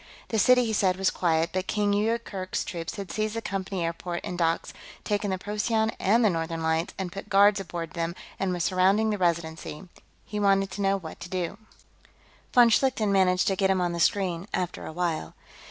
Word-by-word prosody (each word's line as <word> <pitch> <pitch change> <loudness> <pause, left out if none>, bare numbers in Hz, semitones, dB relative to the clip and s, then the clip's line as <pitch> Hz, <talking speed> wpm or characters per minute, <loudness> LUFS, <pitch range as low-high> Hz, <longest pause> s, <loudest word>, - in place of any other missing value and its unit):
The 220 - 0
city, 250 +3 +5
he 220 - -1
said, 185 -3 +2
was 195 0 +2
quiet, 165 -1 +1
but 185 0 -2
King 205 -1 +1
Yoorkerk's 205 -3 -1
troops 165 -2 -5
had 195 -3 -6
seized 215 0 -2
the 230 - -2
Company 190 -2 -3
airport 170 +1 -4
and 180 - -4
docks, 165 -1 0 0.3
taken 205 0 -1
the 190 - -1
Procyon 220 +3 0
and 225 +4 +3
the - - +5
Northern 165 -1 -3
Lights 160 +1 0
and 190 -2 -4
put 195 +2 -8
guards 200 +1 +5
aboard 170 -3 -5
them, 170 0 -3 0.2
and 195 -1 0
were 180 - -2
surrounding 190 +5 +3
the 210 - -2
Residency. 170 -1 -2 0.4
He 210 - -4
wanted 195 -1 +2
to 200 - -5
know 195 0 +2
what 165 -4 -9
to 180 - -8
do. 185 +2 -3 0.9
Von 240 -1 +6
Schlichten 225 -4 +2
managed 185 -2 +3
to 195 - +1
get 190 0 +1
him 190 -1 +2
on 175 -1 0
the 170 - -3
screen, 180 0 +1
after 180 -2 -3
a - - -6
while. 165 - -2
190 Hz, 205 wpm, -27 LUFS, 170-205 Hz, 0.9 s, Von